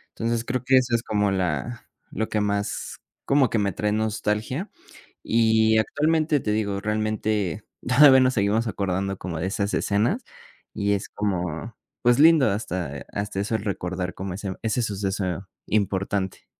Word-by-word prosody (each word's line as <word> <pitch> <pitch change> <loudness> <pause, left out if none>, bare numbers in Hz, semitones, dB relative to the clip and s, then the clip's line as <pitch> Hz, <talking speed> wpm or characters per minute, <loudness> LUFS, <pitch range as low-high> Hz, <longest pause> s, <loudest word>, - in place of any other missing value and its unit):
Entonces 115 0 -1
creo 125 0 -2
que 130 0 +5
eso 125 -2 +2
es 115 - -1
como 105 -1 +1
la 95 - -2 0.2
lo 110 - -3
que 105 - 0
más, 100 0 -2 0.3
como 140 -3 +3
que 110 - +1
me 100 -2 0
trae 105 +1 -1
nostalgia. 110 - -1 0.5
Y 110 -1 +3
actualmente, 155 +4 +1
te 105 - -2
digo, 100 -2 -1
realmente 105 -2 -1 0.2
todavía 130 +1 +7
nos 130 0 +3
seguimos 110 +2 +1
acordando 95 -2 -2
como 85 -3 -5
de 90 - -2
esas 100 +1 -1
escenas 110 - 0 0.5
y 100 0 +1
es 100 - -3
como, 95 +1 -3 0.3
pues, 120 +1 +4
lindo 155 -5 +6
hasta 90 - -4
hasta 100 -1 -4
eso 105 +3 -1
el 110 - -1
recordar 90 -2 -3
como 95 -1 -5
ese 95 -1 -4
ese 115 +2 0
suceso 95 -3 -2 0.2
importante. 100 -2 -1
105 Hz, 155 wpm, -24 LUFS, 95-115 Hz, 0.5 s, todavía